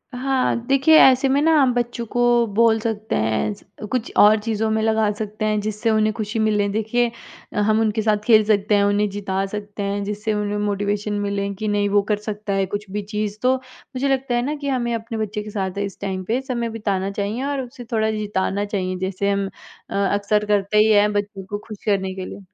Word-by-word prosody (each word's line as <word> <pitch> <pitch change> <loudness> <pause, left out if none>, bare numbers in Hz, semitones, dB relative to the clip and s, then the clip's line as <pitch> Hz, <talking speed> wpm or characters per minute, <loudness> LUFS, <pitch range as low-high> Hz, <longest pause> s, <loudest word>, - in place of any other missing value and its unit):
हाँ, 260 0 +1
देखिए 275 +4 +5
ऐसे 265 +1 +6
में 280 +2 +3
ना 325 +1 +4
हम 255 -2 +3
बच्चों 240 -1 -2
को 245 - 0 0.3
बोल 225 -1 +4
सकते 220 -1 -3
हैं 110 - 0
ऐसे 205 0 -9
कुछ 245 0 -2
और 210 +1 +7
चीज़ों 220 0 -1
में 220 0 +1
लगा 220 -1 +2
सकते 215 0 -4
हैं 215 -1 +1
जिससे 215 +2 -2
उन्हें 215 0 +2
खुशी 220 0 -3
मिले। 210 -2 +2
देखिए, 225 +3 0 0.4
अ, - - -1
हम 215 +1 +3
उनके 220 0 +1
साथ 215 -1 +2
खेल 220 -2 +6
सकते 210 -1 +2
हैं, 200 - +3
उन्हें 205 0 +2
जिता 195 -1 -2
सकते 205 0 -6
हैं 200 0 -2
जिससे 210 +1 -2
उन्हें 210 0 -1
मोटिवेशन 205 0 -1
मिले, 200 0 -2
कि 215 +2 -4
नहीं 205 -1 +1
वो 205 0 +4
कर 210 - +2
सकता 210 -1 -4
है 195 0 +1
कुछ 205 +1 -5
भी 210 +1 -2
चीज़, 210 0 -2
तो 255 +1 +3
मुझे 260 +1 -6
लगता 265 -2 0
है 240 - +2
ना 300 +2 -2
कि 285 -1 -6
हमें 240 -3 0
अपने 225 0 -5
बच्चे 210 -1 -3
के 210 - -8
साथ 195 -2 -3
है 200 - 0
इस 195 - -8
टाइम 190 -1 -3
पे 245 +4 0
समय 240 -3 -3
बिताना 200 -3 -2
चाहिए 205 +6 -3
और 280 -1 -1
उसे 245 -1 -9
थोड़ा 220 -1 +1
जिताना 205 -1 -1
चाहिए 185 -3 -2
जैसे 190 +1 -1
हम 200 0 0 0.4
अ, - - -6 0.2
अक्सर 210 +1 +1
करते 205 0 +1
ही 215 +1 +5
हैं 210 0 +4
बच्चों 205 -1 -3
को 205 +2 -4
खुश 215 -2 -8
करने 190 -2 0
के 185 -1 -5
लिए। - - -8
210 Hz, 225 wpm, -21 LUFS, 205-225 Hz, 0.4 s, और